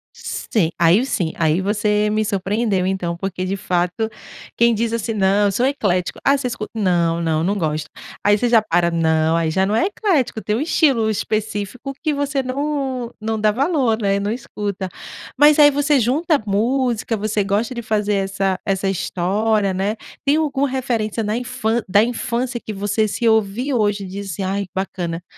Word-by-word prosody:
Sim, 185 -8 -1
aí 170 +7 +4
sim, 175 -10 -1
aí 160 +1 +2
você 210 +1 +1
me 215 0 +1
surpreendeu 200 0 0
então, 180 -3 -2
porque 185 0 -4
de 195 +2 -2
fato 180 +2 -1 0.5
quem 235 0 +4
diz, 230 +1 -1
assim: 230 0 -2
"Não, 200 +1 +3
eu - - +1
sou 240 +6 +1
eclético 200 -10 0
‘ah, 280 +1 +4
você 270 - -5
escuta? 235 -3 -5
‘não, 170 -4 +2
não, 160 -1 0
não 195 +4 +1
gosto", 155 -3 -2 0.3
aí 205 0 +4
você 245 - 0
já 230 -2 +5
para 175 -4 +1
não, 160 -1 +2
“aí 165 -1 +1
já 190 +4 +1
não 205 +2 0
é 230 - +3
eclético“, 340 - 0
tem 210 -1 -1
um 235 - -1
estilo 275 -8 +2
específico 215 +4 -3
que 310 -2 +1
você 285 -1 -1
não 265 -2 -2
não 220 0 -2
dá 215 0 +4
valor, 265 -2 +1
né, 200 -2 +1
não 200 +1 -2
escuta 205 -5 -4 0.5
mas 295 +2 +6
aí 295 -1 +7
você 290 0 +2
junta 295 +8 +2
a 275 - -2
música, 230 +2 0
você 210 0 0
gosta 210 +5 -1
de 240 - -4
fazer 210 -2 0
essa 195 -1 -1
essa 195 0 -1
história, 195 +3 0
né. 195 +3 -1 0.3
Tem 285 +1 +3
alguma 285 -3 0
referência 235 -4 -1
na 210 +1 -1
infân 240 -2 -1
da 205 +3 +5
infância 240 +1 -2
que - - -5
você 205 +2 0
se 230 +3 -1
ouvir 220 +5 +1
hoje 205 -4 +1
e - - -6
disse: 195 -1 -5
“Ai, 195 +2 -1
que 180 - -25
bacana, 175 -3 -3
210 Hz, 185 wpm, -20 LUFS, 190-245 Hz, 0.5 s, aí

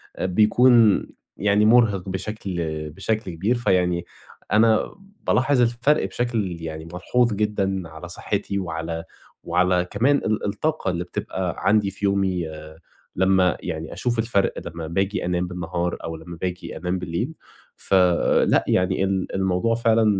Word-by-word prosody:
آآ - - -3
بيكون 110 +3 +5 0.3
يعني 105 +1 +3
مُرهِق 110 -5 +4
بشكل 95 0 -4 0.4
بشكل 100 +2 -2
كبير، 100 +9 0
فيعني 90 -6 +1 0.5
أنا 110 +1 +3 0.3
بالاحظ 130 +3 +3
الفَرق 120 +1 +2
بشكل 100 -5 -2
يعني 80 0 -6
ملحوظ 120 +5 +1
جدًا 100 -2 0
على 80 +2 -9
صحّتي، 100 +2 -3
وعلى 80 -1 -4 0.4
وعلى 90 +1 +2
كمان 130 +7 +3
ال 110 -4 -1
الطاقة 105 +1 -1
اللي 85 0 -2
بتبقى 90 0 -4
عندي 105 -1 +2
في 100 +1 -4
يومي 95 -4 +1 0.7
لمّا 95 -1 +3
يعني 80 0 -5
أشوف 120 -2 -1
الفَرق 110 -4 +1
لمّا 85 -1 -6
باجي 95 +3 -1
أنام 90 0 0
بالنهار، 90 0 -3
أو 80 0 -4
لما 85 +1 -10
باجي 90 -1 -4
أنام 90 +1 -2
بالليل. 85 -1 -3 0.4
فلأ 90 -3 +3
يعني 90 +1 +1
ال 95 -1 -1
الموضوع 95 +4 +1
فعلًا 115 -1 +3
95 Hz, 135 wpm, -23 LUFS, 90-110 Hz, 0.7 s, بيكون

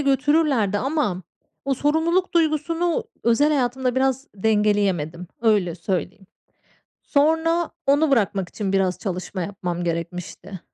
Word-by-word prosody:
götürürlerdi 275 -6 +2
ama 260 - -1 0.4
o 275 0 +1
sorumluluk 325 +7 +1
duygusunu 330 +1 +1 0.2
özel 235 +6 +4
hayatımda 255 -3 0
biraz 265 +1 0
dengeleyemedim, 200 -5 +1 0.2
öyle 200 -7 +2
söyleyeyim. 185 +2 -4 0.8
Sonra 320 +3 +2 0.2
onu 285 +1 +3
bırakmak 200 -6 +1
için 195 -3 -3
biraz 190 -2 +1
çalışma 185 -1 -4
yapmam 175 -2 -4
gerekmişti. 175 +2 -5
230 Hz, 105 wpm, -23 LUFS, 190-295 Hz, 0.8 s, özel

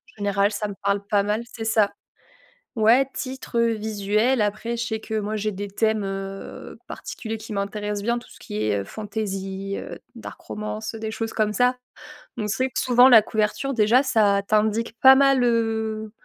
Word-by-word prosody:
Général, 200 0 +1
ça 210 0 -3
me 205 - -6
parle 200 0 0
pas 200 0 +2
mal, 210 +3 -1
c'est 225 -2 -6
ça. 220 -2 +3 0.8
Ouais, 235 +4 +4
titre, 260 -2 -5
heu, 230 0 +3
visuel. 215 +3 0
Après, 215 +3 -2
je 235 - -2
sais 220 -2 -3
que 220 0 -3
moi, 210 +1 -3
j'ai 215 0 -1
des 205 +1 -5
thèmes, 215 +1 0
heu, 195 0 -7
particuliers 225 -1 -6
qui 220 0 -10
m'intéressent 205 0 -3
bien. 235 +1 0
Tout - - -17
ce - - -16
qui 105 +1 -4
est, 105 -1 +1
heu, - - -3
fantaisie, 195 - -5
heu, - - -7 0.2
dark - - -9
romance, 215 +1 -5
des 220 0 -4
choses 225 0 -4
comme 210 -1 0
ça. 250 +4 +3 0.6
On 215 -2 -2
sait 260 +5 0
que - - -3
souvent, 250 0 +6
la 230 -4 +9
couverture, 215 +6 -1
déjà, 230 +2 +4
ça 210 -7 +3
t'indique 220 +2 +1
pas 265 0 +9
mal, 275 -2 +4
heu, 220 -2 0
215 Hz, 185 wpm, -23 LUFS, 205-230 Hz, 0.8 s, la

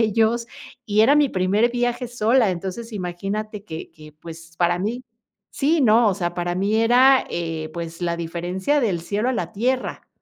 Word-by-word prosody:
ellos, 225 +2 +2 0.4
y 210 0 +2
era 280 +6 +5
mi 295 -2 +4
primer 200 +6 +2
viaje 245 0 -1
sola. 235 -1 +2
Entonces, 190 +6 -5
imagínate 200 +3 -4
que 160 -4 -8
que, 155 -2 -14
pues, 165 +1 -12
para 175 0 +2
mí 230 +7 -3 0.5
Sí, 300 +2 +2
¿no?, 230 0 +5
o 200 - +1
sea, 175 -3 -2
para 175 0 -2
mí 200 +4 0
era, 250 +4 +5
eh, 165 -2 -3
pues, 165 0 -6
la 170 -1 -1
diferencia 180 - -1
del 195 -8 0
cielo 210 +7 -1
a - - -1
la 225 - -3
tierra. 255 +5 -2
205 Hz, 175 wpm, -22 LUFS, 175-235 Hz, 0.5 s, era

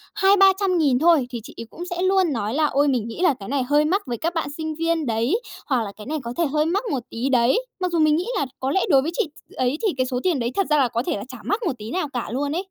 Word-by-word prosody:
200.000-300.000 385 -8 +4
thôi 320 -6 +4
thì 240 -2 -5
chị - - -11
ấy 230 - -6
cũng 350 +6 -8
sẽ 355 0 -3
luôn 375 -4 +2
nói 225 -1 -2
là 305 +1 +2
"Ôi, 285 0 +2
mình 245 -5 0
nghĩ 230 - -7
là 335 - +5
cái 195 - -8
này 275 -2 0
hơi 295 +3 +2
mắc 385 +6 +1
với 240 -1 -3
các 335 +7 -2
bạn 325 -4 -2
sinh 315 -1 -4
viên 330 0 0
đấy", 240 - 0 0.3
hoặc 255 -5 +1
là 200 - -6
"Cái 210 - -10
này 310 +1 -2
có 235 - -5
thể 340 - +2
hơi 300 +2 +1
mắc 380 +7 0
một 255 -4 -2
tí 245 +4 -2
đấy", 250 - +3 0.2
mặc 365 -1 -1
dù 335 - +1
mình 305 -1 +4
nghĩ 360 +7 -1
là 285 - 0
có 265 +1 -1
lẽ 385 - +2
đối 270 -5 +6
với 320 - -2
chị 310 - 0 0.2
t - - -18
ấy 255 +3 0
thì 365 - 0
cái 255 - +1
số 250 -1 -2
tiền 345 -7 +1
đấy 235 +1 -1
thật 395 -2 +1
ra 300 - +4
là 265 -3 +4
có 235 +1 -2
thể - - -1
là 200 - -6
chả 255 -1 -9
mắc 410 +3 0
một 335 -8 0
tí 215 +3 -8
nào 365 -5 -1
cả 245 - -3
luôn 285 +3 -1
ấy. 365 - -1
295 Hz, 310 wpm, -23 LUFS, 250-345 Hz, 0.3 s, đối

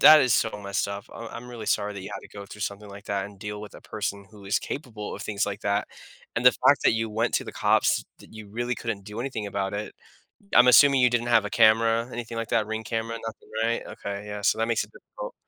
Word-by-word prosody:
that 155 -1 +10
is 130 -3 +3
so 110 - +2
messed 100 0 -1
up, 100 0 -5
I'm 115 -1 -7
I'm 125 +1 -8
really 115 -3 -7
sorry 105 0 +1
that 100 - -6
you 95 - -7
had - - -5
to - - -14
go 100 - -6
through 105 +1 -8
something 100 0 -4
like 100 +1 -11
that 100 -1 -2
and 100 -1 -14
deal 105 +1 -5
with 105 - -10
a - - -11
person 100 -2 -4
who 105 -2 -14
is 100 - +2
capable 115 -7 -6
of - - -8
things 105 0 -1
like 100 0 -4
that, 100 -1 0 0.5
and - - -1
the - - +9
fact - - +4
that - - +6
you 115 0 -1
went 115 +3 0
to - - +1
the - - -7
cops - - +3 0.2
that - - -16
you 110 -2 -10
really 120 +3 -2
couldn't 110 -5 -4
do 105 +3 -6
anything 120 -5 -3
about 100 -1 -2
it. 105 +1 -4 0.6
Uh, - - +6
I'm 125 +1 +8
assuming 140 +2 +7
you 125 - +6
didn't 120 0 0
have 115 -3 +4
a - - -3
camera, 115 +2 +4
anything 115 -1 -6
like 115 -1 -3
that, 110 - +2
Ring 110 0 -3
camera, 115 +1 -3
nothing, 110 - -8
right? 115 +1 0
Okay, 100 0 -6
yeah, 105 0 -5
so 100 - +3
that 115 +1 0
makes 115 -1 +1
it - - -12
difficult. - - -9
110 Hz, 270 wpm, -26 LUFS, 100-115 Hz, 0.6 s, that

